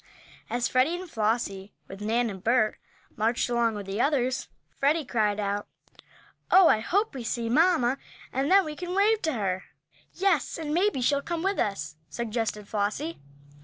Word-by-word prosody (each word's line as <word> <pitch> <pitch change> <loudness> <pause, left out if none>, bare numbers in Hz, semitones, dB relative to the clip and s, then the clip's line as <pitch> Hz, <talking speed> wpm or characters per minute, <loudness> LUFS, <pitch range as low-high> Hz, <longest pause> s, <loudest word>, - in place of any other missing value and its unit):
As 240 0 0
Freddie 260 +7 +2
and 370 - -8
Flossie, 210 - -1
with 195 +1 -10
Nan 230 +2 +1
and 190 -1 -10
Bert, 225 -2 +2 0.4
marched 230 +3 0
along 235 -2 +2
with 205 -1 -5
the 195 +4 -2
others, 260 -3 +1 0.3
Freddie 295 +2 +2
cried 215 -4 0
out: 205 0 -2 0.8
"Oh, 375 -2 +7
I 215 - +4
hope 400 - 0
we 260 -3 -6
see 230 0 -2
mamma, 275 -3 +3 0.3
and 270 +3 0
then 390 -1 +6
we 305 -1 -5
can 355 +3 -5
wave 425 +2 +3
to 315 - 0
her." 190 -5 -2 0.5
"Yes, 370 -7 +1
and 305 -2 -3
maybe 360 -5 +2
she'll 280 +3 +2
come 340 +2 -3
with 390 +1 0
us," 155 -8 -2
suggested 225 -3 -3
Flossie. 215 +11 -2
245 Hz, 165 wpm, -27 LUFS, 215-320 Hz, 0.8 s, Oh